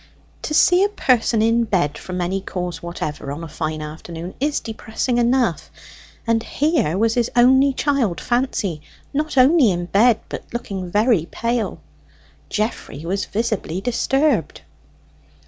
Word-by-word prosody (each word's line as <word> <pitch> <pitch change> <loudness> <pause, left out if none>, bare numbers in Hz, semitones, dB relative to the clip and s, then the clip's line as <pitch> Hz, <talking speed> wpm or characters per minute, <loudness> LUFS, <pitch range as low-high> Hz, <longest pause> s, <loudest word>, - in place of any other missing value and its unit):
To 305 - -3
see 355 +4 +5
a 405 - +2
person 235 - +2
in 230 +1 +3
bed 175 -9 0
from 180 0 -5
any 190 +2 -1
cause 180 -3 -5
whatever, 155 -5 -5
on 150 +4 -6
a - - -6
fine 155 0 -4
afternoon, 165 +3 -7
is 290 +2 0
depressing 225 +2 -2
enough; 240 -7 +1 0.6
and 230 -1 +2
here 280 - 0
was 225 +2 +2
his 240 -1 +1
only 265 +3 +5
child 270 - 0
Fancy, 240 - -1 0.3
not 300 0 -2
only 265 -1 +6
in 175 -2 -1
bed, 215 +5 +4
but - - -6
looking 195 -6 -5
very 210 -3 +2
pale. 230 -3 -2 0.7
Geoffrey 210 -8 -3
was 195 +3 -1
visibly 215 -5 -2
disturbed. 250 - 0
225 Hz, 140 wpm, -21 LUFS, 175-250 Hz, 0.7 s, only